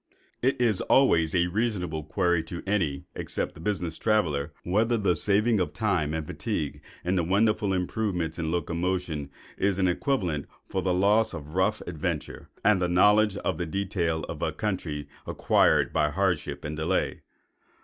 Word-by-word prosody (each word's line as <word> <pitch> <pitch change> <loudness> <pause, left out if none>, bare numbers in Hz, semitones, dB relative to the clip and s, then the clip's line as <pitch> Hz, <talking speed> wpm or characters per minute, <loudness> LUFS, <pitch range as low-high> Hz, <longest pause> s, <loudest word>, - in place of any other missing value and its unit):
It 130 +1 +1
is 115 -6 +2
always 85 - +3
a 85 -1 +4
reasonable 90 -5 -1
query 85 +1 +1
to 85 +1 -7
any, 90 -9 0
except - - -3
a - - -12
business 85 -3 -2
traveller, 80 -10 +1
whether 110 +6 +2
the 100 -5 +2
saving 105 +6 +2
of 90 - -1
time 90 -9 0
and 80 -1 -3
fatigue 75 -1 -3 0.2
in 90 - +1
the 90 -3 +2
wonderful 100 +3 +2
improvements 90 -2 -1
in 80 -1 -1
locomotion 85 -2 -2 0.3
is 95 -1 +1
an 95 -1 +2
equivalent 90 - -1 0.2
for 95 - -2
the 95 - 0
loss 100 +3 +3
of 75 -1 -8
rough 95 +3 +1
adventure 80 -4 -4 0.2
and 105 -2 +5
knowledge 105 +3 +4
of - - -2
the 85 - -2
detail 85 -4 -1
of - - -6
a - - 0
country 85 -8 -3 0.2
acquired - - +3
by 75 - +2
hardship 90 -2 -1
and 75 +1 -4
delay. 85 +4 -1
90 Hz, 160 wpm, -27 LUFS, 80-105 Hz, 0.3 s, and